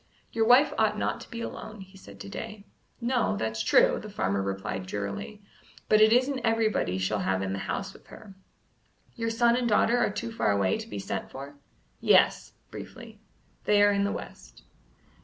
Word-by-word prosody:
"Your 225 -1 +1
wife 275 +4 +6
ought - - +2
not - - -2
to - - -12
be 230 -1 -6
alone," 215 -2 -7
he 190 0 -14
said 100 - -14
to - - -8
Day. 215 - -7 0.3
"No; 240 - 0
that's 110 +1 -2
true!" 110 - +4
the 215 - -9
farmer 100 - -1
replied 95 -1 -4
drearily; 100 - -5 0.5
"but 215 0 +5
it 215 0 +7
isn't 255 +3 +3
everybody 225 - +1
she'll 95 +3 -1
have 95 0 0
in 95 0 -2
the 95 - -3
house - - -3
with - - -18
her." 210 -3 -13 0.8
"Your 230 -1 -2
son 235 +1 +3
and 245 -1 0
daughter 230 +3 +3
are - - +2
too 230 +3 -5
far 225 - 0
away 100 -2 +1
to - - -7
be 105 - -6
sent 100 - -4
for?" 140 +2 -9 0.5
"Yes" - - +3 0.2
briefly - - -10 0.5
"they 205 -1 +4
are 205 - +5
in 200 0 +1
the 200 - 0
west." - - -9
205 Hz, 190 wpm, -27 LUFS, -, 0.8 s, it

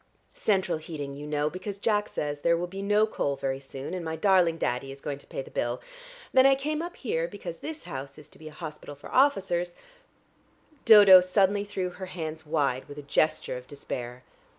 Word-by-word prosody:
Central 190 -6 +1
heating, 150 -3 -6
you 145 +1 -8
know, 150 0 0
because 185 +5 -5
Jack 210 0 +1
says 145 -1 -3
there 170 +3 +3
will 175 - -2
be 190 +2 -7
no 210 +2 +3
coal 140 -9 -2
very 135 -1 -2
soon, 135 +3 -7
and 180 -2 -3
my 160 0 -3
darling 180 -3 +3
Daddy 135 -1 -2
is 135 - -10
going 140 0 -5
to - - -17
pay 135 - -5
the - - -14
bill. 120 +1 -1 0.5
Then 260 0 +7
I 270 - +6
came 300 +3 -2
up 345 +1 -6
here, 165 -10 -2
because 175 -2 -8
this 315 0 -7
house 135 +1 -7
is 150 - -12
to - - -20
be 155 - -10
a - - -8
hospital 150 -2 -8
for 140 - -12
officers 185 -10 +2 0.6
" 305 -3 -34
Dodo 205 -5 +10
suddenly 195 +2 +2
threw 185 -3 -3
her 185 +1 -8
hands 160 -3 -6
wide 145 -4 0
with 145 0 -10
a 145 - -7
gesture 140 -2 0
of 125 0 -11
despair. 125 -3 -6
165 Hz, 210 wpm, -27 LUFS, 145-200 Hz, 0.6 s, Dodo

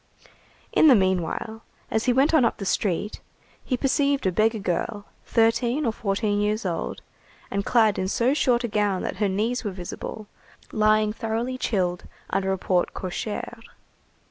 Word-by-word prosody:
In - - +6
the 270 - +8
meanwhile, 190 +3 -1 0.3
as 220 - 0
he 250 - +4
went 270 +6 +3
on 310 -5 +5
up 230 - +1
the 195 - -5
street, 200 +1 -1 0.4
he 255 - -1
perceived 280 0 +1
a 185 - +3
beggar 220 +4 +2
girl, 205 +2 -2 0.2
thirteen 235 +5 +2
or 230 - +2
fourteen 205 0 -1
years 210 0 0
old, 170 -3 -3 0.5
and 200 0 -1
clad 220 -3 +3
in 185 - -1
so 240 +6 +2
short 250 -4 +2
a - - 0
gown 205 -3 0
that - - -4
her 205 0 +1
knees 225 +6 -1
were 210 - -2
visible, 190 +3 -7 0.5
lying 215 0 +3
thoroughly 230 +3 -2
chilled 185 -8 -1 0.3
under 190 0 0
a 190 - 0
porte 180 -1 0
cochère. 210 +5 -4
215 Hz, 165 wpm, -25 LUFS, 195-240 Hz, 0.5 s, the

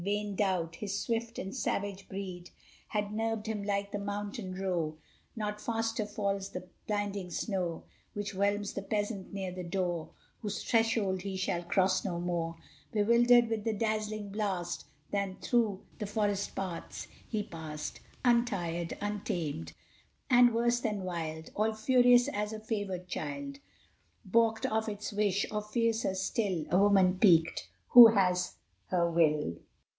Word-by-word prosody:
Vain 205 +1 -1
doubt! 180 -5 0
his 200 -1 -3
swift 230 0 -2
and 190 - -5
savage 200 -1 -2
breed 185 -2 -6 0.4
Had 210 -1 -2
nerved 225 0 -1
him 220 -2 -2
like 200 0 -1
the 205 - -2
mountain 205 -1 -4
roe; 175 -5 -1 0.4
Not 210 -1 -3
faster 225 -1 -1
falls 200 -2 -2
the 185 -1 -7 0.2
blinding 205 -3 -2
snow 180 -3 -2 0.3
Which 205 -1 -3
whelms 205 +1 0
the 200 - -3
peasant 205 -1 -2
near 195 -2 -3
the 180 0 -6
door 175 -2 -2 0.3
Whose 205 -2 -4
threshold 225 -5 +2
he 195 0 -4
shall 180 -2 -1
cross 185 +2 +2
no 175 -4 -2
more, 170 -1 -2 0.4
Bewildered 235 +3 +5
with 225 -2 -2
the 225 -1 0
dazzling 215 -1 -2
blast, 195 -4 -2 0.3
Than 200 -2 -1
through 220 -5 0
the 210 - -3
forest 205 -1 -1
paths 185 -3 -5 0.2
he 215 -3 -1
passed 155 -4 -6 0.3
Untired, 190 -9 +1
untamed, 170 - -3 0.6
and 245 -1 +7
worse 235 +1 +2
than 210 -5 -2
wild; 160 -3 -4
All 220 +1 +1
furious 245 +2 +5
as 210 +1 -2
a 215 - -5
favored 205 -5 -3
child 280 +7 -5 0.7
Balked 225 +2 +2
of 220 0 0
its 210 0 -5
wish; 205 -1 +1
or 210 0 -1
fiercer 225 -2 0
still 190 -3 -1
A 180 - +5
woman 195 -2 +4
piqued 165 -6 +4 0.2
who 240 -1 +12
has 180 -2 +2 0.3
her 175 -2 +2
will. 155 - +2
200 Hz, 145 wpm, -31 LUFS, 185-220 Hz, 0.7 s, who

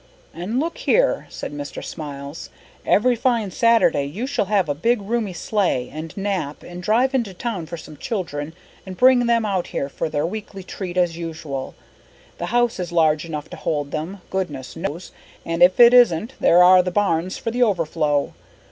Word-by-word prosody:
"And 185 +9 -3
look 330 +3 -3
here," - - +2
said - - -7
Mr. 145 -1 -6
Smiles. 145 -1 -7 0.4
"Every 245 +4 +4
fine 230 -4 0
Saturday 230 -10 +3
you 185 - -4
shall 270 -6 -1
have 195 -3 +1
a 145 - 0
big, 230 +11 +1
roomy 210 -1 -2
sleigh 175 - -1
and 160 +3 -7
Nap, 195 -7 -3
and 175 0 -9
drive 240 +8 +2
into 230 -8 -1
town 195 -7 -4
for 170 - -6
some 155 -1 -11
children 160 -7 -4 0.3
and 185 -1 -9
bring 250 -1 +5
them 230 -1 +2
out 190 -4 -1
here 140 - -3
for 155 - -3
their 150 0 -1
weekly 195 +1 -6
treat 185 -1 -6
as 175 -2 +1
usual. 160 -5 -6 0.6
The - - -3
house 240 -1 +1
is 180 -1 -4
large 155 -2 +2
enough 155 -3 -5
to - - -7
hold 145 -2 -2
them, 170 +6 -5
goodness 145 -10 -4
knows, 170 0 -5 0.3
and 165 +1 -3
if 180 +1 +6
it 240 0 +8
isn't 235 -1 +4
there 175 +1 +6
are 185 +1 +7
the 180 - -2
barns 185 -2 0
for 230 - -3
the 245 +2 -2
overflow. 160 -8 +1
180 Hz, 185 wpm, -22 LUFS, 155-220 Hz, 0.6 s, it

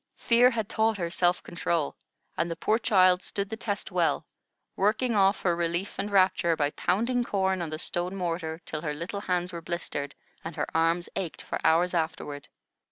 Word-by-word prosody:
Fear 240 +1 +5
had 225 -4 -2
taught 220 -1 +1
her 170 -3 -2
self 175 -1 +2
control, 170 -3 -1 0.4
and 170 +2 0
the 165 - -3
poor 215 +7 +1
child 185 -4 +4
stood 200 +2 -4
the - - -2
test 210 -2 -4
well, - - +1 0.5
working 215 +5 +1
off 195 -1 +3
her 175 -2 +2
relief 170 +3 -2
and 205 - -1
rapture 185 -4 +3
by 145 -2 0
pounding 240 +10 +1
corn 190 -4 0
on 170 - -3
the 155 - -4
stone 175 +3 -2
mortar 165 -3 -3
till 155 - -4
her 150 -2 -3
little 180 +6 -5
hands 180 -2 -1
were 170 - -5
blistered, 165 -4 -4 0.3
and 165 -1 -6
her - - -1
arms 165 +2 +2
ached 185 -5 -4
for - - -4
hours 175 +3 +3
afterward. 160 -4 -3
180 Hz, 185 wpm, -28 LUFS, 165-200 Hz, 0.5 s, Fear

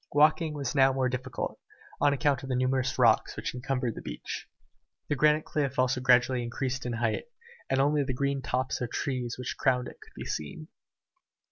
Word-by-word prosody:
Walking 155 +1 +4
was 140 -4 -2
now 135 -2 +5
more 130 -1 +1
difficult, 130 +1 -4 0.4
on 145 - +4
account 140 -2 +1
of 135 - -8
the 130 - 0
numerous 130 0 +1
rocks - - +4
which - - -3
encumbered 125 -1 -2
the - - -8
beach. - - -6 0.6
The 145 - +2
granite 150 +1 +3
cliff 140 -3 -1
also 130 0 +2
gradually 125 0 +4
increased 125 +2 -3
in 120 - -2
height, 115 -1 -1 0.4
and 135 - +2
only 145 +1 +3
the 135 - -2
green 140 +1 0
tops 130 0 -1
of 125 - -2
the - - -14
trees 125 -3 -2
which 125 -1 -4
crowned 125 -1 +2
it - - -12
could - - -17
be - - -7
seen. 155 - -5
130 Hz, 195 wpm, -29 LUFS, 125-140 Hz, 0.6 s, now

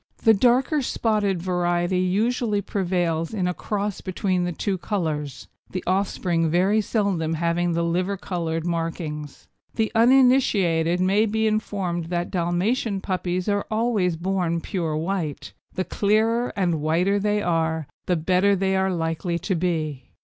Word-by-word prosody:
The 225 - +7
darker 255 +7 +3
spotted 210 -7 0
variety 175 0 0
usually 210 +4 +1
prevails 175 -2 -1
in 185 -4 0
a 180 - 0
cross 205 +1 -3
between 185 -1 -1
the 175 - -2
two 190 +3 -2
colours, 155 - -3 0.2
the 185 - -4
offspring 180 -3 0
very 190 +6 +3
seldom 190 -7 0
having 170 +1 0
the 170 0 0
liver 180 +4 0
coloured 165 -4 -3
markings. 165 -3 -4 0.3
The 220 -1 0
uninitiated 225 -9 +4
may 200 +4 +3
be 220 +1 0
informed 195 -5 -1
that 175 +1 -3
Dalmatian 195 +5 0
puppies 185 -1 -2
are 205 -1 0
always 215 -6 +1
born 175 -1 -1
pure 165 -4 -2
white. 165 -3 -3 0.2
The 185 - -1
clearer 220 +4 +1
and 175 -6 0
whiter 175 +6 +2
they 210 +1 0
are 160 -3 0 0.2
the 180 - +2
better 185 +5 +2
they 190 0 0
are 190 0 +2
likely 165 0 -2
to 190 - -2
be. 155 -7 -2
185 Hz, 140 wpm, -24 LUFS, 170-205 Hz, 0.3 s, The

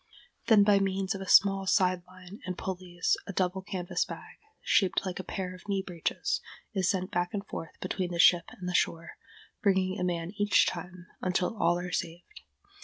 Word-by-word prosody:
Then 220 -3 +7
by 200 -1 +5
means 195 0 0
of 195 - -6
a 190 - -6
small 195 -1 +5
side 185 -2 +3
line 185 +2 -12
and 185 -1 -5
pulleys 180 -2 -1
a 200 - -5
double 185 +1 0
canvas 180 -1 -2
bag, - - -10 0.3
shaped 190 -1 +2
like 185 -1 -4
a - - -4
pair 185 -1 -4
of 185 +2 -14
knee 195 -1 0
breeches, 170 -3 -2 0.3
is 190 -3 +1
sent 185 -1 -1
back 175 +2 -1
and 200 0 -3
forth 165 - -8
between 185 -2 -2
the 170 - -3
ship 170 0 +6
and 180 - -8
the 180 - -2
shore, 165 -1 0 0.5
bringing 190 -1 +2
a - - -1
man 175 -1 -2
each 205 0 +4
time, 180 +1 -5 0.2
until 185 +3 0
all 175 -4 +2
are 180 0 -5
saved. 175 - -5
185 Hz, 190 wpm, -29 LUFS, 180-195 Hz, 0.5 s, Then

